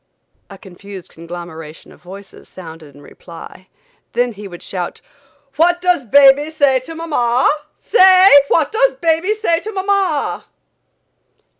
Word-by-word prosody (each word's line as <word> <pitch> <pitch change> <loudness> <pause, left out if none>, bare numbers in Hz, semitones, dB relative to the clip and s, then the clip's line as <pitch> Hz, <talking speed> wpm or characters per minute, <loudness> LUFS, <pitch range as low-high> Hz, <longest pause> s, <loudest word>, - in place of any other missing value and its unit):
A 195 - -12
confused 190 0 -13
conglomeration 165 -2 -11
of - - -19
voices 195 +2 -14
sounded 160 -5 -13
in 145 - -17
reply; 170 +4 -14 0.5
then 245 0 0
he 210 -2 -10
would 175 -2 -12
shout: 180 -2 -6 0.6
"What 350 +2 +2
does 355 -8 0
baby 280 +4 +5
say 285 -4 +1
to 290 +6 -11
mamma? 260 -7 0 0.3
Say; 375 -2 +4 0.2
what 315 0 0
does - - +1
baby 340 0 0
say 340 -6 -1
to 435 - -8
mamma?" 380 - -2
265 Hz, 130 wpm, -16 LUFS, -, 0.6 s, baby